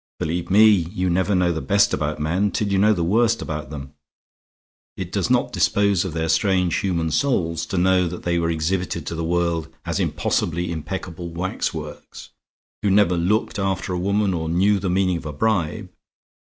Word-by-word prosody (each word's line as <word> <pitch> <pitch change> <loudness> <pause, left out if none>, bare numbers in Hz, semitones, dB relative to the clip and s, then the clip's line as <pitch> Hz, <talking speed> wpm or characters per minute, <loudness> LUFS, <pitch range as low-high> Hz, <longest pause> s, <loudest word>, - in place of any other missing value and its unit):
Believe 85 +2 -3
me, 105 +3 +6
you 90 -2 +1
never 95 +3 +1
know 90 -1 +2
the 80 - -3
best 100 0 +2
about 75 +1 -2
men 90 +7 0
till 105 +1 -2
you 100 -1 +1
know 105 +2 +5
the 90 -5 0
worst 115 +6 +2
about 75 -4 -5
them. 70 -2 -8 1.0
It - - -5
does - - -1
not - - +2
dispose 100 -3 +2
of 95 -5 -5
their 80 0 -1
strange 90 0 +2
human 85 -4 -1
souls 85 - 0
to 95 - -3
know 90 0 +3
that 90 +1 -7
they 85 -1 0
were 85 0 0
exhibited 85 +3 -2
to - - -4
the 85 0 -3
world 85 -1 -1 0.2
as - - -2
impossibly 85 +1 -1
impeccable 85 +2 -5
wax 85 +3 -2
works, - - -9 0.5
who 105 - +1
never 95 -2 +4
looked 100 +5 0
after 95 -1 -1
a 90 - -2
woman 100 +1 +1
or 80 -2 -3
knew 100 +4 +2
the 95 -1 -2
meaning 90 -1 +1
of 85 - -8
a 75 - -5
bribe. 100 +2 -1
90 Hz, 190 wpm, -22 LUFS, 85-100 Hz, 1.0 s, me